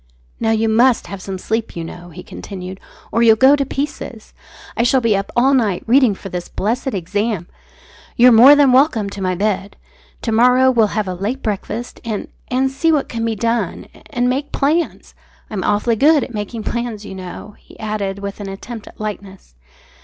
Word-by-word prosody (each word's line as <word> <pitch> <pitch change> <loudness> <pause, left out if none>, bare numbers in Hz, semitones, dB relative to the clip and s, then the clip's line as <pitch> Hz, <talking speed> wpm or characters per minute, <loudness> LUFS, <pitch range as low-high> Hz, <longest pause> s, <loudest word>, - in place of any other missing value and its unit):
"Now 225 - 0
you 225 0 +2
must 235 +3 +3
have 200 -1 -8
some 190 0 -5
sleep, 220 +4 -3
you 170 - -4
know," 175 +1 -9
he 165 - -10
continued, 185 -1 -8 0.3
"or 230 - +1
you'll 225 -1 +6
go 265 +5 +6
to 285 - 0
pieces. 270 -5 -5 0.4
I - - +1
shall 245 +3 +3
be 230 -4 +2
up 195 0 -3
all 265 +3 +4
night 215 -9 +1
reading 245 -3 +4
for 195 - -9
this 180 -1 -5
blessed 240 +4 -2
exam. 205 +1 -2 0.7
You're 245 +1 +7
more 245 +6 +9
than 285 -3 +5
welcome 250 -6 +3
to 200 - -7
my 185 -1 0
bed. 200 +1 -2 0.5
To 225 - -1
morrow 250 +3 +5
we'll 230 -4 +3
have 210 -2 0
a 185 - -2
late 205 +9 -4
breakfast 220 +3 -4
and 220 -4 -4 0.2
and 265 +1 0
see 300 +5 +1
what 300 -3 0
can 230 -1 -3
be 225 -1 -1
done 230 +2 -1 0.2
and 245 -3 0
make 270 +3 -1
plans 315 +4 -1 0.4
I'm 195 -4 -3
awfully 215 +3 +1
good 295 +3 +4
at 245 - -8
making 215 +1 -5
plans, 235 -3 -4
you 195 - -8
know," 190 +2 -9
he - - -19
added 210 -3 -3
with 200 0 -6
an 200 -1 -6
attempt 215 +3 -8
at - - -15
lightness. 200 - -7
225 Hz, 195 wpm, -18 LUFS, 200-250 Hz, 0.7 s, more